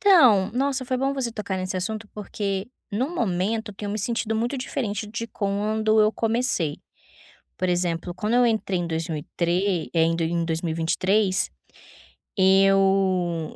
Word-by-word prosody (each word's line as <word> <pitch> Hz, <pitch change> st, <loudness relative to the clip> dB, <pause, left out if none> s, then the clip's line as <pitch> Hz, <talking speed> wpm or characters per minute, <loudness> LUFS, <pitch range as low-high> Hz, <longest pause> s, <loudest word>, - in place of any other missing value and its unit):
Então, 250 Hz, -, +6 dB
nossa, 265 Hz, +1 st, 0 dB
foi 255 Hz, 0 st, -1 dB
bom 270 Hz, +2 st, 0 dB
você 265 Hz, -4 st, -2 dB
tocar 210 Hz, -3 st, -3 dB
nesse 185 Hz, 0 st, -3 dB
assunto, 215 Hz, +3 st, -4 dB
porque 200 Hz, -1 st, -3 dB, 0.2 s
no 255 Hz, +11 st, -2 dB
momento 215 Hz, -, -1 dB
eu -, -, -13 dB
tenho 205 Hz, +1 st, -5 dB
me 215 Hz, -, -2 dB
sentido 230 Hz, 0 st, -1 dB
muito 235 Hz, +5 st, -1 dB
diferente 225 Hz, -5 st, -3 dB
de 225 Hz, +2 st, -5 dB
quando 215 Hz, +1 st, +1 dB
eu 215 Hz, +1 st, +4 dB
comecei. 225 Hz, -, 0 dB, 0.8 s
Por 185 Hz, 0 st, 0 dB
exemplo, 175 Hz, -1 st, -1 dB
quando 210 Hz, +5 st, -2 dB
eu 245 Hz, 0 st, +5 dB
entrei 215 Hz, -5 st, 0 dB
em 175 Hz, -, -2 dB
dois 160 Hz, -1 st, -2 dB
mil 160 Hz, -, -3 dB
e -, -, -9 dB
trê 175 Hz, 0 st, 0 dB
eh, 165 Hz, -, +3 dB
em 165 Hz, +1 st, +2 dB
do 165 Hz, -, -1 dB
em 170 Hz, +1 st, 0 dB
2023, 170 Hz, +4 st, 0 dB, 0.9 s
eu 190 Hz, -3 st, +3 dB
200 Hz, 165 wpm, -24 LUFS, 180-225 Hz, 0.9 s, Então